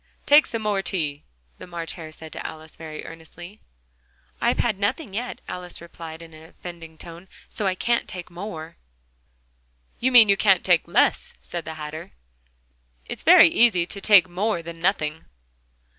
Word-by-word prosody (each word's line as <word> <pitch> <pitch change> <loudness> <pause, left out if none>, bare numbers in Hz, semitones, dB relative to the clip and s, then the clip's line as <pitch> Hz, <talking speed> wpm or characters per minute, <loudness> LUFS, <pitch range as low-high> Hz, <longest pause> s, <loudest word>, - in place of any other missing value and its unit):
"Take 295 +1 +6
some 230 -1 -4
more 205 -2 0
tea," 150 -7 -3 0.4
the - - -10
March 170 -2 -5
Hare 160 -3 -9
said 160 0 -11
to - - -6
Alice, 160 0 -8
very 155 -1 -8
earnestly. 175 +5 -11 0.8
"I've - - +2
had 215 -5 0
nothing 215 +2 -2
yet," 245 +4 -5
Alice 180 -1 -7
replied 165 -1 -10
in 165 -1 -14
an 155 0 -13
offended 165 -3 -11
tone, 170 +2 -11 0.2
"so 210 - -3
I 185 - 0
can't 235 +5 0
take 180 -1 -8
more." 170 -3 -8 1.2
"You 260 +2 +1
mean 240 -3 +9
you 200 0 +4
can't 195 -4 +4
take 175 -2 +3
less," 170 - +1
said 175 -2 -6
the 160 0 -6
Hatter: 155 +1 -8 0.9
"It's - - -5
very - - +8
easy 190 -4 +4
to 200 +3 -7
take 195 -3 +6
more 180 0 -2
than 165 0 -9
nothing." 160 -4 -1
175 Hz, 165 wpm, -24 LUFS, 160-200 Hz, 1.2 s, mean